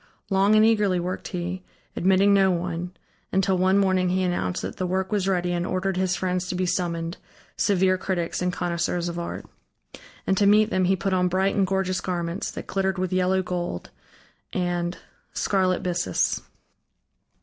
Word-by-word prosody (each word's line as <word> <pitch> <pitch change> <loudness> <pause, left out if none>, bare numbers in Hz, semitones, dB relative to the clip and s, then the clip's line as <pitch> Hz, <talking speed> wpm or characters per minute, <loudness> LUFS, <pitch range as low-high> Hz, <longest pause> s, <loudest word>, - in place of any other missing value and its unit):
Long 195 +2 +4
and 215 0 +6
eagerly 210 -5 +3
worked 180 +2 -4
he, 180 0 -4 0.3
admitting 190 +2 +4
no 195 -1 +5
one, 175 0 -2 0.4
until 190 0 +2
one 190 +1 +3
morning 185 -2 +2
he 185 +1 +1
announced 175 - -1
that - - -5
the 185 - -1
work 190 +2 -1
was 200 -3 0
ready 180 -2 +1
and 175 0 -1
ordered 185 +1 -1
his 185 0 +1
friends 180 0 -1
to 185 - -3
be 185 +1 0
summoned, 170 -1 -2 0.4
severe 185 -2 +2
critics 175 -3 -2
and 180 0 +1
connoisseurs 175 0 -1
of 170 0 -4
art. 170 - -5 0.8
And 190 - +2
to 200 - +4
meet 215 +2 +5
them 185 -1 +2
he 190 +2 +3
put 190 +1 -2
on 180 -1 +2
bright 190 +2 +1
and 195 -2 +2
gorgeous 190 -1 0
garments, 175 +1 -3
that - - -7
glittered 190 -1 -1
with 185 0 -2
yellow 185 +1 +2
gold 175 - -4 0.6
and 175 -1 -1 0.4
scarlet 185 -2 +1
byssus. 175 - 0
185 Hz, 170 wpm, -25 LUFS, 175-190 Hz, 0.8 s, and